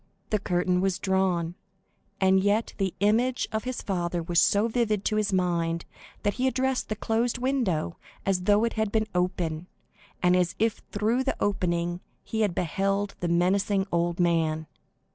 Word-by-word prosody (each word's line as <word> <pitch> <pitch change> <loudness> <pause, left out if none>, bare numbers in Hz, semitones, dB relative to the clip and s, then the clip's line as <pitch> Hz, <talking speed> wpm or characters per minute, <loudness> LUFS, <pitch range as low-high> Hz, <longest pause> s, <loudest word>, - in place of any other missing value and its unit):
The 215 - +2
curtain 180 -1 +1
was 190 -1 +1
drawn, 185 -3 0 0.7
and 190 0 +4
yet 205 +3 +1
the 190 -2 -1
image 235 +5 +2
of 220 +2 -2
his 255 -1 -4
father 175 -3 -1
was 170 +1 +3
so 205 +3 +3
vivid 220 -4 0
to 215 - +1
his 210 -1 +1
mind 170 -3 0 0.4
that 205 -1 +1
he 255 +1 0
addressed 260 0 0
the 215 - -1
closed 225 +3 0
window 245 - 0 0.3
as 185 -2 0
though 205 +2 +4
it 230 - 0
had 220 -2 -1
been 220 -1 +1
open, 180 -2 -1 0.6
and 180 0 +5
as 180 0 +1
if 225 0 0
through 220 +5 +1
the - - -1
opening 175 -3 0 0.2
he 220 - -2
had 200 -5 +1
beheld 195 +4 0
the 175 - -1
menacing 190 +3 +2
old 170 0 0
man. 160 -2 +1
195 Hz, 165 wpm, -27 LUFS, 175-215 Hz, 0.7 s, and